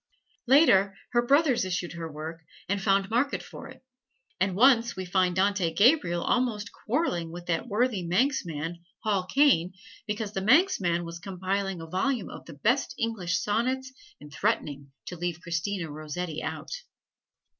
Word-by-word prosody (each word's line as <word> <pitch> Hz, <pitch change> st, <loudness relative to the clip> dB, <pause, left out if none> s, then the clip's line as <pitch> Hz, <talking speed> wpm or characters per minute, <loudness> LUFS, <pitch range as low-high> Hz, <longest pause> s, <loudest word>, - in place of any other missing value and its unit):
Later, 205 Hz, -9 st, +5 dB
her 240 Hz, -, +3 dB
brothers 275 Hz, -1 st, +3 dB
issued 180 Hz, -2 st, -3 dB
her 165 Hz, -1 st, -6 dB
work 160 Hz, +2 st, -7 dB, 0.3 s
and 200 Hz, 0 st, -1 dB
found 195 Hz, 0 st, +2 dB
market 255 Hz, +5 st, 0 dB
for 270 Hz, -, -10 dB
it; 260 Hz, -1 st, -14 dB, 0.6 s
and 190 Hz, 0 st, +1 dB
once 235 Hz, +1 st, +4 dB
we 185 Hz, -, -5 dB
find 180 Hz, 0 st, +1 dB
Dante 190 Hz, -2 st, +1 dB
Gabriel 200 Hz, -, +4 dB
almost 225 Hz, -5 st, 0 dB
quarreling 210 Hz, -, -2 dB
with 175 Hz, +1 st, -8 dB
that 175 Hz, +7 st, -1 dB
worthy 225 Hz, -1 st, +1 dB
Manxman, 170 Hz, -, -1 dB, 0.2 s
Hall 200 Hz, -4 st, +1 dB
Caine, 220 Hz, -, +3 dB, 0.3 s
because 210 Hz, 0 st, -3 dB
the 195 Hz, -, -2 dB
Manxman 200 Hz, -, +3 dB
was 170 Hz, 0 st, -7 dB
compiling 190 Hz, 0 st, -3 dB
a -, -, -7 dB
volume 200 Hz, +7 st, -1 dB
of -, -, -10 dB
the 165 Hz, -, -10 dB
best 235 Hz, -, 0 dB
English 220 Hz, -8 st, -1 dB
sonnets 255 Hz, +5 st, -1 dB, 0.3 s
and 150 Hz, 0 st, -13 dB
threatening 140 Hz, -1 st, -1 dB
to 180 Hz, -, -6 dB
leave 175 Hz, -1 st, -3 dB
Christina 170 Hz, 0 st, -3 dB
Rossetti 155 Hz, +2 st, -5 dB
out. -, -, -5 dB
195 Hz, 150 wpm, -27 LUFS, 170-240 Hz, 0.6 s, Later